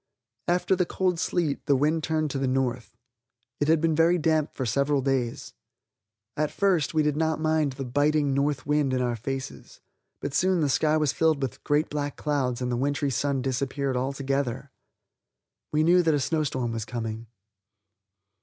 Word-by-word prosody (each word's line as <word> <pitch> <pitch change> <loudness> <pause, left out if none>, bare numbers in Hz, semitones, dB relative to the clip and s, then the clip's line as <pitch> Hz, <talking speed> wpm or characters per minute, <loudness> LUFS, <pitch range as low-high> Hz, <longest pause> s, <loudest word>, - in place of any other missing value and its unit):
After 180 +2 +2
the 180 -1 0
cold 180 -3 0
sleet, 165 -5 -1
the 140 - +4
wind 155 +4 +1
turned 155 -2 0
to 135 - -2
the 135 - 0
north. 130 -2 -2 0.6
It 145 - +1
had 160 0 +4
been 165 0 +1
very 165 +3 +4
damp 155 -2 0
for 130 - -2
several 140 +4 +1
days. 130 -3 -2 0.8
At 150 0 0
first 180 -7 +1
we 155 - +3
did 150 -1 +1
not 160 0 0
mind 155 -3 +1
the 135 0 -5
biting 145 +2 +1
north 140 -1 0
wind 145 -2 +1
in 130 - 0
our 120 -1 0
faces, 135 +4 -6 0.4
but 140 - -4
soon 185 +1 +2
the 145 - +1
sky 155 +3 +2
filled 155 +1 +2
with 130 - -5
great 150 +2 +1
black 145 -1 -3
clouds 130 -4 -1
and 125 - -1
the 120 - 0
wintry 140 +2 0
sun 140 -1 -1
disappeared 135 +1 -1
altogether. 135 0 -2 1.0
We 155 +1 +2
knew 175 +2 +5
that 160 -3 +2
a - - +1
snowstorm 135 -5 -1
was 115 -1 -3
coming. 115 -1 -5
145 Hz, 175 wpm, -26 LUFS, 130-155 Hz, 1.0 s, knew